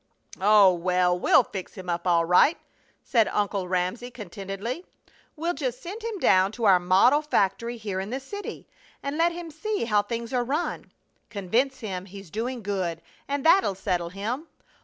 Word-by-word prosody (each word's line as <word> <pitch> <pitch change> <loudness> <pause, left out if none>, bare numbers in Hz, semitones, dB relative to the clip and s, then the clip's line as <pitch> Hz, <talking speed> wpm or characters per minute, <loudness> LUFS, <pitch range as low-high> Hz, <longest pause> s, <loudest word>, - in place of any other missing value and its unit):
"Oh, 200 -1 +6
well, 180 +1 +2
we'll 255 - +5
fix 190 -4 -8
him 185 -1 -9
up 170 +1 -2
all 170 -1 +3
right!" 180 - +5 0.5
said 225 -3 +3
Uncle 200 -2 -1
Ramsey, 185 +7 -1
contentedly. 205 - -6 0.5
"We'll 335 +3 -1
just 255 -4 -3
send 410 +6 -8
him 455 -2 -3
down 190 - +4
to 235 - -6
our 195 -4 +6
model 190 +11 +4
factory 235 -4 0
here 205 -4 -4
in 190 +2 -4
the 260 +3 -3
city 405 +10 -8 0.4
and 280 +1 -3
let 335 +2 +3
him 340 -1 -7
see 410 - -2
how 210 -2 +3
things 235 +3 -5
are 250 -1 +2
run. 290 +8 -3 0.4
Convince 235 +7 -1
him 190 -4 -4
he's 195 -3 -11
doing 235 +2 -3
good, 180 -5 -2 0.2
and 280 0 -2
that'll 335 - +5
settle 175 -2 -2
him! 225 - -4
215 Hz, 170 wpm, -26 LUFS, 185-270 Hz, 0.5 s, Oh